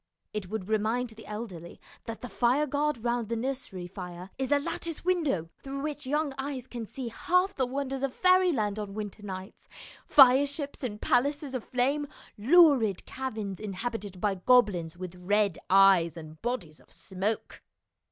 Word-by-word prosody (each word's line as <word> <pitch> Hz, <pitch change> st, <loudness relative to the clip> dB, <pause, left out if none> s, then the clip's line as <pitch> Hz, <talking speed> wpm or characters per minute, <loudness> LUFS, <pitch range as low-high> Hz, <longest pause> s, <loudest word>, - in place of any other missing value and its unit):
It 210 Hz, -4 st, -4 dB
would 215 Hz, -3 st, -4 dB
remind 220 Hz, +3 st, 0 dB
the 220 Hz, -1 st, -13 dB
elderly 200 Hz, -6 st, -7 dB, 0.3 s
that 230 Hz, -1 st, -6 dB
the 250 Hz, -, -5 dB
fireguard 285 Hz, +1 st, +1 dB
round 240 Hz, -2 st, -1 dB
the 230 Hz, -, 0 dB
nursery 245 Hz, -7 st, -4 dB
fire 180 Hz, 0 st, -8 dB
is 265 Hz, 0 st, -2 dB
a 290 Hz, -, +6 dB
lattice 330 Hz, +3 st, -4 dB
window 300 Hz, -, +1 dB
through 275 Hz, 0 st, -5 dB
which 295 Hz, -2 st, -4 dB
young 295 Hz, 0 st, 0 dB
eyes 265 Hz, -2 st, -4 dB
can 240 Hz, -3 st, -7 dB
see 255 Hz, 0 st, -5 dB
half 360 Hz, -, +1 dB
the 260 Hz, -2 st, 0 dB
wonders 270 Hz, 0 st, -3 dB
of 275 Hz, -1 st, 0 dB
fairyland 340 Hz, -, +3 dB
on 205 Hz, -1 st, -5 dB
winter 210 Hz, -1 st, -6 dB
nights, 190 Hz, -1 st, -8 dB, 0.3 s
fireships 280 Hz, +2 st, +5 dB
and 210 Hz, -4 st, -3 dB
palaces 280 Hz, +2 st, +1 dB
of 255 Hz, -4 st, -3 dB
flame, 275 Hz, +4 st, 0 dB, 0.3 s
lurid 255 Hz, -, +5 dB
caverns 215 Hz, -8 st, -5 dB
inhabited 205 Hz, -1 st, -5 dB
by 205 Hz, +1 st, +1 dB
goblins 185 Hz, -6 st, +3 dB
with 180 Hz, -1 st, -7 dB
red 205 Hz, -1 st, +2 dB
eyes 190 Hz, -4 st, +5 dB
and 155 Hz, -1 st, -10 dB
bodies 225 Hz, -11 st, -3 dB
of -, -, -24 dB
smoke. 195 Hz, +3 st, -4 dB
235 Hz, 155 wpm, -29 LUFS, 195-275 Hz, 0.3 s, a